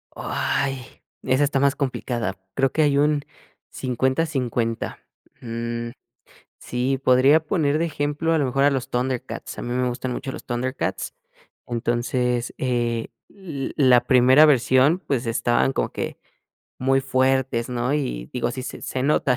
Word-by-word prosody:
Oh, -, -, -7 dB
ay, 135 Hz, -1 st, -1 dB, 0.4 s
esa 130 Hz, +2 st, +2 dB
está 140 Hz, -1 st, +1 dB
más 140 Hz, 0 st, +3 dB
complicada, 120 Hz, -7 st, -2 dB, 0.2 s
creo 135 Hz, -1 st, +2 dB
que 155 Hz, -, +1 dB
hay 145 Hz, -2 st, +3 dB
un 145 Hz, 0 st, +2 dB, 0.5 s
50-50. 130 Hz, -3 st, -1 dB, 0.4 s
Mm, 115 Hz, 0 st, -4 dB, 0.7 s
sí, 130 Hz, +2 st, -1 dB
podría 135 Hz, +5 st, +5 dB
poner 155 Hz, -3 st, +1 dB
de 165 Hz, -, +1 dB
ejemplo 150 Hz, +1 st, -1 dB
a 160 Hz, -, +3 dB
lo 145 Hz, -, +1 dB
mejor 135 Hz, +2 st, +1 dB
a 145 Hz, -, +5 dB
los 135 Hz, -2 st, -2 dB
ThunderCats, 125 Hz, 0 st, -3 dB
a -, -, -4 dB
mí -, -, -5 dB
me 125 Hz, 0 st, +1 dB
gustan 125 Hz, +1 st, -3 dB
mucho 135 Hz, +2 st, -4 dB
los -, -, -9 dB
ThunderCats. 130 Hz, +2 st, -3 dB, 0.5 s
Entonces, 120 Hz, +1 st, -1 dB
eh, 120 Hz, -3 st, -1 dB, 0.2 s
l 160 Hz, -9 st, -6 dB
la 130 Hz, -4 st, +6 dB
primera 130 Hz, +3 st, +6 dB
versión, 135 Hz, +3 st, +4 dB
pues, 135 Hz, -9 st, -2 dB
estaban 120 Hz, +3 st, +1 dB
como -, -, -1 dB
que -, -, -5 dB, 0.6 s
muy 135 Hz, +1 st, +2 dB
fuertes, 130 Hz, -2 st, +1 dB
¿no? 125 Hz, +2 st, -1 dB
Y -, -, -2 dB
digo, 120 Hz, -1 st, -1 dB
así 130 Hz, +1 st, -5 dB
se -, -, -7 dB
se 130 Hz, -, -3 dB
nota 140 Hz, -3 st, +2 dB
130 Hz, 150 wpm, -23 LUFS, 120-140 Hz, 0.7 s, la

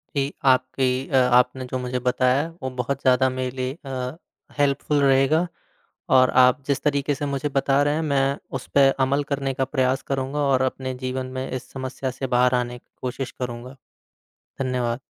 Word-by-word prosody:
जी, 140 Hz, +1 st, 0 dB
आपकी 130 Hz, 0 st, +2 dB
अ, -, -, -1 dB
आपने 125 Hz, 0 st, +3 dB
जो 130 Hz, +1 st, -3 dB
मुझे 125 Hz, 0 st, -2 dB
बताया 130 Hz, +4 st, +2 dB, 0.2 s
वो 130 Hz, -, -1 dB
बहुत 135 Hz, +2 st, -3 dB
ज़्यादा 130 Hz, 0 st, +4 dB
मेरे 130 Hz, 0 st, -3 dB
लिए 130 Hz, +3 st, -3 dB
अ, 130 Hz, +2 st, -4 dB, 0.4 s
हेल्पफुल 145 Hz, +1 st, +1 dB
रहेगा। 140 Hz, +5 st, +3 dB, 0.7 s
और 130 Hz, 0 st, +5 dB
आप 125 Hz, +3 st, +4 dB
जिस 140 Hz, -2 st, 0 dB
तरीके 145 Hz, -1 st, +1 dB
से 145 Hz, +2 st, -4 dB
मुझे 140 Hz, +1 st, -2 dB
बता 135 Hz, +1 st, +3 dB
रहे 145 Hz, 0 st, +1 dB
हैं, 160 Hz, -, -1 dB
मैं 140 Hz, -2 st, +1 dB, 0.2 s
उस -, -, -11 dB
पे 140 Hz, -1 st, +7 dB, 0.2 s
अमल 140 Hz, +2 st, +1 dB
करने 135 Hz, -1 st, -1 dB
का 135 Hz, 0 st, -1 dB
प्रयास 130 Hz, -1 st, 0 dB
करूँगा। 135 Hz, +1 st, -2 dB
और 135 Hz, -3 st, +2 dB
अपने 130 Hz, 0 st, -2 dB
जीवन 130 Hz, 0 st, -2 dB
में 130 Hz, -, -3 dB
इस 130 Hz, -1 st, -5 dB
समस्या 130 Hz, 0 st, -4 dB
से 135 Hz, +1 st, -5 dB
बाहर 125 Hz, 0 st, +3 dB
आने 125 Hz, 0 st, -2 dB
की -, -, -47 dB
कोशिश 130 Hz, +1 st, -4 dB
करूँगा। 125 Hz, +1 st, -5 dB, 0.8 s
धन्यवाद। 125 Hz, -2 st, -1 dB
130 Hz, 180 wpm, -23 LUFS, 125-140 Hz, 0.8 s, पे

